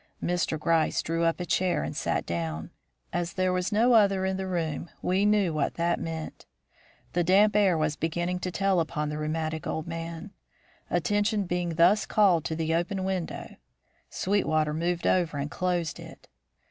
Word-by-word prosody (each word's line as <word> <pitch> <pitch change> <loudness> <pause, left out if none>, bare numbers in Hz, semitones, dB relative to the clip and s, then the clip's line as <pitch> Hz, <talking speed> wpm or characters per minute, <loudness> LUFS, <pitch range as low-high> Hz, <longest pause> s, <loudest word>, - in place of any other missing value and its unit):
Mr. 175 -3 0
Gryce 165 0 +1
drew 165 +1 0
up 165 +1 +1
a 180 - -3
chair 180 0 +1
and - - -5
sat - - -1
down. 80 -2 -4 0.4
As 175 0 -2
there 185 -1 +1
was 180 +2 -1
no 230 +4 +4
other 200 -4 +4
in 190 0 0
the 190 0 -3
room 165 -3 -2
we 190 +3 +2
knew 205 -5 +2
what 150 -2 -1
that 170 0 0
meant. 160 -1 -6 0.7
The 175 - +2
damp 200 +4 +4
air 195 -5 +4
was 155 -1 0
beginning 175 +3 -2
to 180 - -3
tell 195 0 +1
upon 155 -2 -2
the 150 0 -4
rheumatic 155 +1 -2
old 160 - -3
man. 165 -1 -6 0.6
Attention 205 +5 +1
being 175 -2 -2
thus 180 +5 +4
called 190 -7 +4
to 160 - -2
the 160 0 -1
open 185 +3 -1
window, 185 -3 -4 0.5
Sweetwater 155 -6 0
moved 170 +2 -1
over 170 -5 +2
and 145 +1 -3
closed 175 -3 -1
it. - - -12
175 Hz, 170 wpm, -27 LUFS, 160-190 Hz, 0.7 s, no